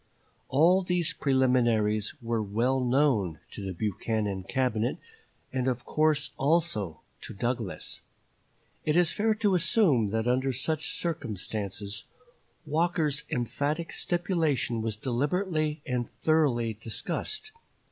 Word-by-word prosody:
All 170 +7 +5
these 180 -2 +1
preliminaries 120 -6 +2
were 115 -1 0
well 115 +6 +1
known 125 - +2
to 100 - -7
the 95 - -3
Buchanan 105 +1 -2
Cabinet, 125 0 0 0.6
and 130 -1 0
of 130 +1 -1
course 155 -1 +2
also 135 - +1 0.2
to - - -8
Douglas. 120 -2 -3 0.8
It 150 - +1
is 175 -1 +4
fair 220 +1 +1
to 210 -2 +2
assume 165 - +3
that 110 +3 -1
under 130 +2 +2
such 155 +4 -1
circumstances 105 - -4 0.6
Walker's 155 -1 +1
emphatic 145 +7 -1
stipulation 160 - 0
was 110 -1 -2
deliberately 150 - -1
and 125 -2 -2
thoroughly 135 -8 +1
discussed. 115 - -4
130 Hz, 110 wpm, -28 LUFS, 110-155 Hz, 0.8 s, All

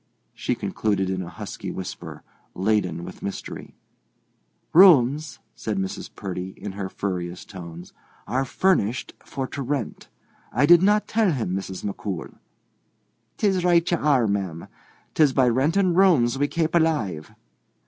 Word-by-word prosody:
she - - -2
concluded 95 -3 -1
in 95 0 -2
a 85 - -6
husky - - -7
whisper, 95 -1 -7 0.3
laden 95 -4 0
with - - -10
mystery. 100 - -6 1.0
"Rooms," 155 -4 +6 0.2
said 110 -2 -4
Mrs. 95 0 -4
Purdy, 95 0 -5
in 105 - -6
her 95 -1 -5
furriest 90 -3 -4
tones, 85 -2 -9 0.3
"are 130 +2 0
furnished 130 - 0
for 135 -1 -4
to 140 - -5
rent. 135 -2 -4 0.4
I 130 +5 +3
did 175 +2 +7
not 210 +2 +3
tell 220 -4 +2
him, 110 - -2
Mrs. 95 0 -5
McCool." 100 -3 -5 1.0
"'Tis 190 -4 +1
right 175 -1 +3
ye - - +4
are, 145 -6 +2
ma'am; 95 -5 -2 0.5
'tis 150 -4 +4
by 130 -2 +4
renting 165 +10 +2
rooms 165 -10 +4
we 145 +2 +1
kape 160 +1 -1
alive. 145 - 0
120 Hz, 140 wpm, -24 LUFS, -, 1.0 s, did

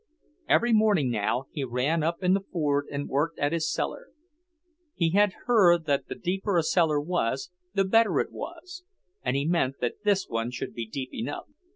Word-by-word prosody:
Every 240 0 +4
morning 205 - +3
now 120 +4 -1
he 145 - -3
ran 135 +6 0
up 170 +4 -2
in 180 0 +4
the 195 - +2
Ford 145 -4 0
and 145 0 -3
worked 150 +4 -1
at 145 +1 0
his 165 -2 0
cellar. - - -3 0.9
He 165 -2 +1
had 205 +1 +3
heard 175 -9 +5
that 140 -2 0
the - - -5
deeper 190 +1 -1
a 165 - +3
cellar 160 -3 +2
was, 145 -2 -2 0.2
the 195 -1 +3
better 210 -4 +3
it - - -1
was; 350 +3 -8 0.4
and - - -1
he 140 +1 0
meant 155 -5 +1
that 120 - -3
this 200 -2 +2
one 115 +1 -2
should 125 - -5
be 115 -2 -5
deep 130 +3 -6
enough. 130 +6 -4
165 Hz, 190 wpm, -27 LUFS, 140-195 Hz, 0.9 s, heard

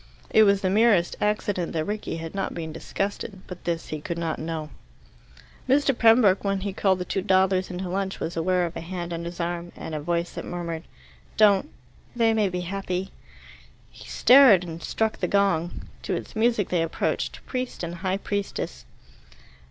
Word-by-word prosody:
It 220 - +6
was 200 -1 +3
the 185 - +1
merest 205 -4 +4
accident 205 -4 0
that 160 -1 -1
Rickie 210 -5 -3
had 165 0 -6
not 195 - -3
been 160 -2 -5
disgusted. 195 +3 -4
But 180 -1 -10
this 170 -1 -2
he 155 -1 -4
could 170 +2 -4
not 165 -2 -2
know. 160 -1 -4 1.0
Mr. 275 0 +3
Pembroke, 225 -4 +5
when 195 -1 0
he 200 0 -3
called 190 -1 +2
the 180 - -4
two 195 - -1
dawdlers 190 -1 +2
into 185 0 -4
lunch, 190 +1 -2
was 165 - -4
aware 180 +2 +1
of 170 - -6
a - - -4
hand 175 0 -5
on 170 0 -4
his 170 +1 -7
arm 175 0 -3
and 160 - -7
a 155 - -2
voice 170 +3 -1
that - - -6
murmured, 170 -2 -5 0.5
"Don't 210 +5 +5 0.5
they 230 -2 +3
may 215 -3 +2
be 180 0 -3
happy." 190 +1 -3 0.8
He - - -13
stared, 250 -8 +7
and 165 -1 -7
struck 220 +6 -1
the 180 - 0
gong. 180 -4 +1 0.2
To - - -2
its - - -7
music 220 -2 +2
they 175 -2 +1
approached, 165 0 -2
priest 255 -6 -4
and 170 0 -4
high 190 0 0
priestess. 195 - -4
185 Hz, 185 wpm, -25 LUFS, 170-205 Hz, 1.0 s, stared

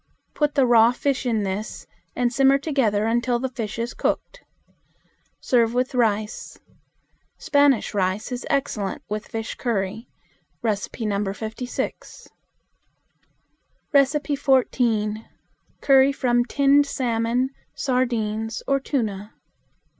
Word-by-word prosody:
Put 295 -1 0
the 275 - +4
raw 235 -1 +5
fish 270 0 -1
in 220 -3 +1
this 200 +2 -4 0.3
and 245 -1 0
simmer 270 +1 +4
together 260 -8 0
until 240 +2 +1
the 260 +2 -3
fish 225 -4 -5
is 235 +1 -3
cooked. - - -2 1.0
Serve 235 -2 +2
with 255 +2 0
rice. 215 -3 -1 0.8
Spanish 285 -4 +2
rice 195 +4 -1
is 250 +1 -4
excellent 260 -8 -2
with 210 0 -4
fish 225 0 -5
curry. 220 -1 -3 0.6
(No. 220 -3 +2 0.6
56.) 225 +4 -5 2.1
14. 230 -5 +1 0.6
Curry 270 0 +5
from 240 -3 +1
Tinned 280 +2 +3
Salmon, 245 0 0 0.2
Sardines, 225 -4 -1
or 275 0 +2
Tuna. 215 -7 -3
240 Hz, 100 wpm, -23 LUFS, 220-265 Hz, 2.1 s, raw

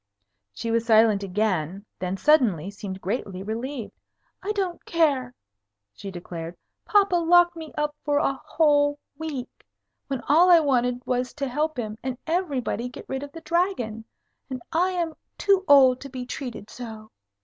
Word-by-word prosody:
She 230 - -4
was 230 0 +2
silent 220 -2 +5
again; 195 -2 -1
then 185 +1 -2
suddenly 210 - +3
seemed 195 -2 -7
greatly 190 -2 -3
relieved. 230 +3 -4 0.5
"I 405 - -2
don't 380 -4 -2
care," 275 -7 +1 0.6
she 195 - -8
declared. 170 -2 -7 0.3
"Papa 400 -3 +4
locked 345 +1 +5
me 320 -2 -8
up 300 0 -1
for 290 -1 +1
a 280 - +2
whole 290 0 +2 0.2
week, 290 -6 -6 0.4
when 270 -3 -3
all 335 +5 +6
I 345 -2 +8
wanted 250 -4 +1
was 250 0 -1
to 280 -2 -2
help 300 +3 -1
him 220 -2 -4
and 260 -1 -3
everybody 285 -8 -1
get 250 - -10
rid 265 0 -3
of 285 0 -7
the 330 - -10
Dragon. 335 - -1 0.5
And 255 -2 -5
I 350 +3 +2
am 345 -3 -2 0.2
too 395 -2 +3
old 265 -3 +7
to 275 - -8
be 250 -1 -6
treated 245 -5 -6
so. 220 -3 -9
260 Hz, 160 wpm, -25 LUFS, 220-315 Hz, 0.6 s, I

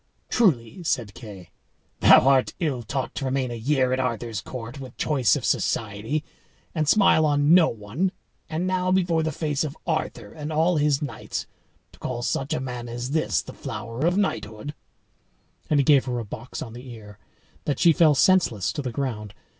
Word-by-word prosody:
"Truly," 170 - +1
said 120 - -1
Kay, 95 -2 -11 0.5
"thou - - +7
art 135 -2 +3
ill 145 -8 -1
taught 125 +2 -3
to 140 - -4
remain 130 -1 -1
a - - -3
year 130 +2 +1
at 130 - 0
Arthur's 115 -4 -2
court, 125 +1 -7
with 130 -3 -10
choice 135 -6 +2
of - - -3
society, 110 +8 -1 0.5
and 155 -3 0
smile 195 -6 +5
on 145 +1 +3
no 180 -2 +6
one, 115 - -2 0.4
and 165 +3 -2
now 185 0 0
before 175 -3 +2
the 160 0 -1
face 150 -1 -1
of 150 -1 -5
Arthur 160 -2 -3
and 150 0 -6
all 160 +2 +2
his 145 -1 +2
knights 145 - -5 0.5
to - - -20
call 120 -1 -4
such 135 +2 -1
a - - 0
man 125 -2 -5
as 120 +2 -4
this 155 +1 +1
the - - -10
flower 115 +8 -4
of 180 +2 +1
knighthood;" 110 - -2 1.0
and 150 - +3
he - - +4
gave 140 -2 +5
her 125 -2 -2
a 115 - -4
box 110 +4 -7
on 115 - -9
the 125 +2 -10
ear, 105 -3 -11 0.5
that 145 -3 0
she 170 - +5
fell 155 -3 +5
senseless 130 - +3
to 150 - -3
the 130 -3 -4
ground. 115 -6 -4
135 Hz, 185 wpm, -25 LUFS, 115-155 Hz, 1.0 s, thou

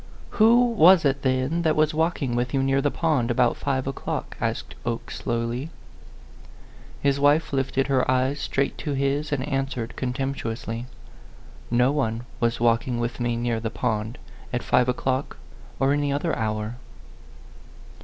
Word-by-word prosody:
" - - -20
Who 235 +3 +7
was 185 -7 +6
it, 135 0 +1
then, 130 +5 0
that 160 -2 +2
was 155 +1 +2
walking 160 -5 0
with 125 +2 -1
you 135 - +2
near 135 0 +2
the 145 - +2
pond, 145 -7 0
about 120 0 +2
five 130 -2 -1
o'clock 135 0 -4
?" - - -17
asked - - -2
Oke, - - -4
slowly. 120 +5 -2 1.3
His 140 0 +2
wife 145 +2 +3
lifted 135 0 0
her 135 -2 +1
eyes 130 +2 +1
straight 140 0 -1
to 145 - -3
his 140 +2 0
and 140 -1 -1
answered, 135 -4 -2
contemptuously, 125 -3 -3 0.8
"No 125 +2 +3
one 120 -5 -1 0.2
was 120 0 0
walking 120 +1 +1
with 120 +1 -3
me 120 -1 0
near 120 -1 -1
the 115 0 -3
pond, 110 +1 -2 0.3
at 125 - -2
five 125 0 +3
o'clock 130 +2 -1 0.4
or 135 +1 +3
any 145 -1 0
other 145 +4 0
hour." 110 +1 -2
135 Hz, 155 wpm, -25 LUFS, 120-145 Hz, 1.3 s, Who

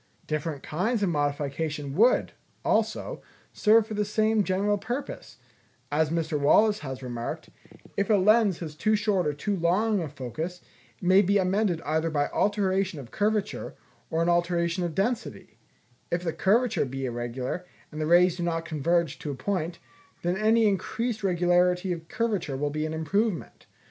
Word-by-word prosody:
Different 155 -2 -3
kinds 205 +8 -1
of 195 - +2
modification 145 -1 -2
would, 225 - +3 0.3
also, - - 0 0.3
serve 220 +1 +4
for 220 - -7
the 210 0 0
same 215 +1 +2
general 200 +2 +1
purpose: 240 +7 -5 0.5
as 150 +1 +2
Mr. 160 -2 -1
Wallace 210 +9 +4
has 130 -2 -7
remarked, 120 -2 -5 0.4
"If 200 - 0
a 215 - +5
lens 205 -1 +4
has 155 -3 -5
too 215 +8 +1
short 205 -5 +1
or 150 - 0
too 200 +8 -2
long 190 +4 +1
a 160 - -4
focus, 155 +7 -6 0.4
it - - -16
may 185 +2 +6
be 200 +1 +2
amended 190 -2 +1
either 160 +2 0
by 145 -2 +1
an - - -3
alteration 195 -4 +1
of 125 -4 -10
curvature, 210 -1 -1 0.3
or 165 +1 +1
an 170 - +1
alteration 175 0 +1
of 170 -3 -3
density; 225 +4 -3 0.5
if 175 +1 -1
the 165 -2 -1
curvature 225 - +2
be 135 +1 -4
irregular, 125 +8 -4 0.2
and 155 0 -5
the 155 - 0
rays 175 +1 +5
do - - -4
not 165 -1 -1
converge 165 -2 0
to 150 - -5
a 140 - -3
point, 170 +3 -2 0.5
then 175 +1 +1
any 220 +3 +3
increased 215 +3 -2
regularity 180 0 +2
of 165 -1 -8
curvature 210 - -1
will 145 +1 -1
be 155 +1 -2
an 155 - -5
improvement. 190 +5 -2
175 Hz, 170 wpm, -27 LUFS, 155-205 Hz, 0.5 s, may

